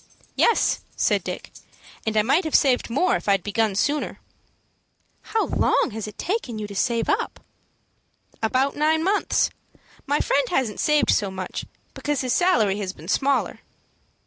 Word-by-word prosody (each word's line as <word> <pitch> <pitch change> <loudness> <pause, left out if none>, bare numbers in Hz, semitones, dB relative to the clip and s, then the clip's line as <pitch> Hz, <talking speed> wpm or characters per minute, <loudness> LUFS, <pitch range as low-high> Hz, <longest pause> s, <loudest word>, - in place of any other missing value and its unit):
"Yes," 465 - +3 0.2
said - - +1
Dick, - - -6 0.6
"and 220 0 0
I 215 - +5
might 280 - +3
have 315 - -1
saved 255 -4 +3
more 285 +10 +2
if - - -5
I'd 195 -3 +3
begun 210 -1 0
sooner." 290 +8 -1 1.0
"How 445 - -1
long - - +1
has 220 -1 -5
it 210 - -10
taken 355 - -2
you 215 - -4
to 205 - -8
save 230 +2 0
it - - +4
up?" - - -6 1.0
"About 255 +5 +1
nine 315 +2 +2
months. 400 +3 +1 0.6
My 290 +2 +2
friend 275 -2 +1
hasn't 245 -6 -1
saved 300 -2 +3
so 205 -2 +1
much, 190 -1 -5 0.3
because 290 -2 -2
his 255 -2 0
salary 220 - +2
has 190 -2 -3
been 160 -1 -13
smaller." 275 +5 +1
255 Hz, 160 wpm, -23 LUFS, 210-300 Hz, 1.0 s, I